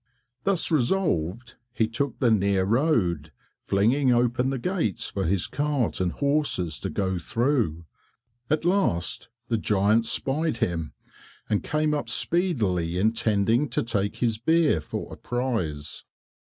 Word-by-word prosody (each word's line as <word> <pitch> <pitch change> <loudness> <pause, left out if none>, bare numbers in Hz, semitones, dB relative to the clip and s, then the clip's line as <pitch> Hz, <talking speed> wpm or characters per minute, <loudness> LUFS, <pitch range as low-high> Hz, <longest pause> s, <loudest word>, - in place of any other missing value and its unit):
Thus 195 -4 +1
resolved, 120 - 0 0.2
he 115 -2 +1
took 125 +4 -2
the 120 -3 +2
near 100 -2 +2
road, 100 - +1 0.3
flinging 125 +7 +2
open 120 +1 +2
the 135 - -1
gates 145 - -1
for - - -2
his 90 +2 +1
cart 145 -8 -1
and 90 -1 +1
horses 140 - 0
to - - -4
go 95 -2 -1
through. 115 - 0 0.6
At 155 +2 0
last 175 - 0 0.2
the 115 -2 +1
giant 105 +3 +2
spied 150 0 0
him, 85 -7 -2 0.5
and 105 -2 +1
came 155 0 0
up 145 -6 -2
speedily, 110 - 0
intending 110 +5 +2
to - - -1
take 100 -3 -1
his 115 -3 -1
beer 155 - +3
for 75 - -6
a - - -9
prize. 110 - -3
115 Hz, 135 wpm, -25 LUFS, 95-145 Hz, 0.6 s, beer